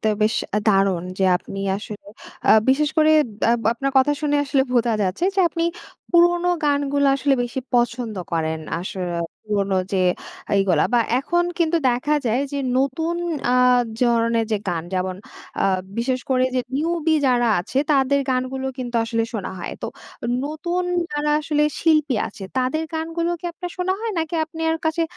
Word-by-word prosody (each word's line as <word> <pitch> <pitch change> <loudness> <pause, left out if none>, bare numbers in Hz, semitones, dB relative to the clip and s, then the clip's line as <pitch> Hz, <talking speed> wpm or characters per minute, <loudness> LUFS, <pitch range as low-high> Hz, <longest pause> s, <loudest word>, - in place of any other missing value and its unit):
তো - - +3
বেশ 215 +2 +2 0.3
দারুন 195 -4 +3
যে 190 - +2
আপনি 195 +2 -9 0.2
আসলে 210 0 -9 0.4
আ - - +8 0.2
বিশেষ 290 +3 +3
করে 310 0 +5 0.4
আব 235 - 0
আপনার 275 +3 -2
কথা 265 +3 +3
শুনে 290 -1 +2
আসলে 275 -1 +2
বোঝা 240 -1 +2
যাচ্ছে 190 - -1
যে 390 - +2
আপনি 335 0 -2 0.5
পুরোনো 345 0 +4 0.2
গানগুলো 285 -1 +1
আসলে 275 0 +2
বেশি 245 +2 -3
পছন্দ 240 -2 0 0.2
করেন, 160 -1 -1 0.2
আসরে 185 +1 -4 0.4
পুরোনো 200 -2 0 0.2
যে 190 -1 +2 0.5
এইগুলা 185 -6 +3
বা 240 - +5 0.2
এখন 345 +6 +1
কিন্তু 335 0 +2
দেখা 250 +5 0
যায় 235 +4 +1
যে 285 - -2 0.2
নতুন 320 +6 0 0.4
আ - - +3 0.5
জরনের 230 -1 +2
যে - - +3
গান 170 -2 -1
যেমন 185 0 -1 0.5
আ - - +3 0.3
বিশেষ 255 +2 0
করে 255 -1 +3
যে 255 - +2 0.2
নিউবি 325 +1 +1
যারা 240 -2 +3
আছে 245 +9 -3
তাদের 280 0 +3
গানগুলো 260 +1 -1
কিন্তু 245 -1 -5
আসলে 225 0 -1
শোনা 210 -5 -4
হয়। 175 - -5
তো - - -1 0.6
নতুন 330 +5 -2 0.3
যারা 295 0 0
আসলে 300 -1 0 0.2
শিল্পী 305 -4 +3
আছে 200 - -12 0.2
তাদের 260 +5 0
গানগুলো 330 +1 -2
কি - - -18
আপনার 355 +1 -7
শোনা 365 +1 +1
হয় 455 -1 -2
নাকি 325 +1 -2
আপনার 320 0 -2
কাছে 320 +1 +1
265 Hz, 160 wpm, -22 LUFS, 225-315 Hz, 0.6 s, আ